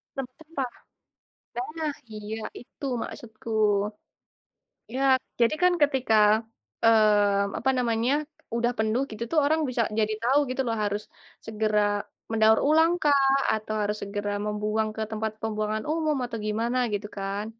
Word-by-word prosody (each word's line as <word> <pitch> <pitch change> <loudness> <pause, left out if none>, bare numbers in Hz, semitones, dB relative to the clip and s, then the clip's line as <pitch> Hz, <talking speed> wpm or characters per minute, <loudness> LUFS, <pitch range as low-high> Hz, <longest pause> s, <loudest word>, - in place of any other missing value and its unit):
Tem 270 -2 -3
tempah. 300 -5 -4 1.1
Nah 310 -2 -1 0.2
iya 215 +1 -5 0.2
itu 260 +3 -10 0.2
maksudku. 225 0 -9 1.5
Ya, 265 - -1 0.4
jadi 235 +6 +4
kan 360 0 +6
ketika, 265 -5 +2 0.7
eee, 205 -3 +4
apa 265 - +1
namanya, 235 +1 +1 0.4
udah 240 +1 +1
penuh 220 +4 +1
gitu 215 +1 -7
tuh 325 - +1
orang 315 +2 +2
bisa 240 -2 0 0.2
jadi 215 0 +1
tahu 260 +4 +4
gitu 255 +1 -2
loh 230 -1 0
harus 205 +1 -1 0.4
segera 215 -1 +1 0.5
mendaur 220 0 +5
ulang 320 +2 +5
kah? 275 -2 +4 0.2
Atau 215 0 -3
harus 210 +1 -1
segera 205 0 -3
membuang 210 +1 0
ke 220 - -2
tempat 220 0 -2
pembuangan 215 0 -2
umum? 310 -2 0
Atau 235 -2 -5
gimana? 230 +4 0
Gitu 205 0 -2
kan. 200 +2 -3
225 Hz, 135 wpm, -26 LUFS, 215-265 Hz, 1.5 s, kan